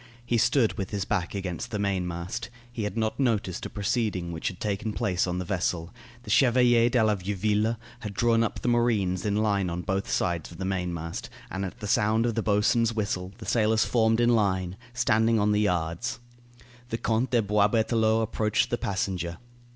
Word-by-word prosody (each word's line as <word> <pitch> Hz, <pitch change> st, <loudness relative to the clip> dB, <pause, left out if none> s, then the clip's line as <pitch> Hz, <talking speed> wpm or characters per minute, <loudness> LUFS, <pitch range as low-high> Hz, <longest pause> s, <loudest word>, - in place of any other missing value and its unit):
He 120 Hz, -1 st, +1 dB
stood 115 Hz, -1 st, +2 dB
with 95 Hz, -, -3 dB
his 100 Hz, -2 st, -2 dB
back 95 Hz, -2 st, -1 dB
against 95 Hz, -5 st, -4 dB
the 105 Hz, -, -3 dB
mainmast. 90 Hz, -3 st, -2 dB, 0.2 s
He 110 Hz, -3 st, -3 dB
had 105 Hz, +1 st, -4 dB
not 110 Hz, +2 st, -1 dB
noticed 110 Hz, -8 st, 0 dB
a -, -, -13 dB
proceeding 100 Hz, -5 st, -1 dB
which 80 Hz, -1 st, -4 dB
had 90 Hz, -, -4 dB
taken 105 Hz, +1 st, -2 dB
place 95 Hz, -2 st, 0 dB
on 90 Hz, 0 st, -2 dB
the 90 Hz, -, -3 dB
vessel. 85 Hz, -1 st, -2 dB, 0.3 s
The -, -, -6 dB
Chevalier 120 Hz, -2 st, +5 dB
de 120 Hz, -2 st, +3 dB
la 110 Hz, -1 st, +3 dB
Vieuville 105 Hz, +3 st, 0 dB, 0.2 s
had 105 Hz, -4 st, -6 dB
drawn 115 Hz, 0 st, +3 dB
up 115 Hz, -, -3 dB
the -, -, -3 dB
marines 110 Hz, -6 st, +1 dB
in 100 Hz, -, +1 dB
line 100 Hz, -3 st, +1 dB
on 85 Hz, +1 st, -4 dB
both 95 Hz, +2 st, -2 dB
sides 85 Hz, -2 st, -1 dB
of 85 Hz, -, -11 dB
the 95 Hz, -, -4 dB
mainmast, 90 Hz, -3 st, -3 dB, 0.2 s
and 95 Hz, +1 st, -3 dB
at 100 Hz, +5 st, -6 dB
the 105 Hz, -, -4 dB
sound 110 Hz, +2 st, +2 dB
of 120 Hz, -, 0 dB
the 115 Hz, -, 0 dB
boatswain's 110 Hz, +2 st, +2 dB
whistle 100 Hz, -4 st, -2 dB
the -, -, -9 dB
sailors 110 Hz, -1 st, +2 dB
formed 115 Hz, -1 st, +2 dB
in 120 Hz, 0 st, +4 dB
line, 95 Hz, -4 st, +1 dB, 0.2 s
standing 115 Hz, -2 st, +2 dB
on 105 Hz, 0 st, +2 dB
the 105 Hz, 0 st, +2 dB
yards. 90 Hz, +2 st, -1 dB, 0.7 s
The 115 Hz, -, -2 dB
Count 115 Hz, +3 st, 0 dB
de 120 Hz, -2 st, +2 dB
Boisberthelot 110 Hz, +2 st, +2 dB
approached 110 Hz, -1 st, 0 dB
the 120 Hz, -, 0 dB
passenger. 95 Hz, -3 st, -2 dB
105 Hz, 190 wpm, -27 LUFS, 95-115 Hz, 0.7 s, Chevalier